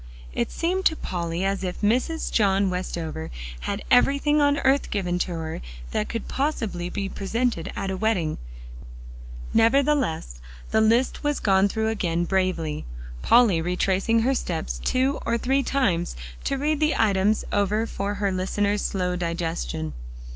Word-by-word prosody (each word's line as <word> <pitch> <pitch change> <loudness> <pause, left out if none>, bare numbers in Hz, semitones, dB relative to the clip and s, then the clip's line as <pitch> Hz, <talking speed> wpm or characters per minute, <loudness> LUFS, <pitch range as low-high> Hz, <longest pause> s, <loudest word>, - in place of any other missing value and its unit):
It 120 - -1
seemed 365 +3 -1
to 320 - +4
Polly 170 - -3
as 195 0 -1
if 180 -1 -4
Mrs. 250 +10 +1
John 195 -2 +3
Westover 165 - -4 0.3
had 200 - -3
everything 280 +4 +4
on 285 0 +3
earth 270 +1 +2
given 180 -3 -1
to 180 - -1
her 160 -1 -4 0.3
that 105 - -1
could 230 - -4
possibly 225 - -2
be 195 +2 -3
presented 200 -2 -2
at 195 - -2
a 190 - -3
wedding; 185 -7 0 1.1
nevertheless 225 - +2 0.3
the 220 - +4
list 230 +6 +2
was 295 -1 0
gone 195 -1 +4
through 220 +1 0
again 175 -6 0
bravely, 175 -5 0 0.4
Polly 210 - +5
retracing 190 +6 +1
her 260 +4 +2
steps 160 - -3
two 265 +3 +1
or 235 - +1
three 265 +4 +1
times 235 -11 0 0.3
to 275 - 0
read 300 +2 0
the 310 0 +2
items 210 0 +2
over 205 +2 +1
for 205 -2 -3
her 200 -1 0
listener's 200 +2 0
slow 180 -2 -1
digestion. 165 - -3
200 Hz, 145 wpm, -25 LUFS, 180-245 Hz, 1.1 s, Polly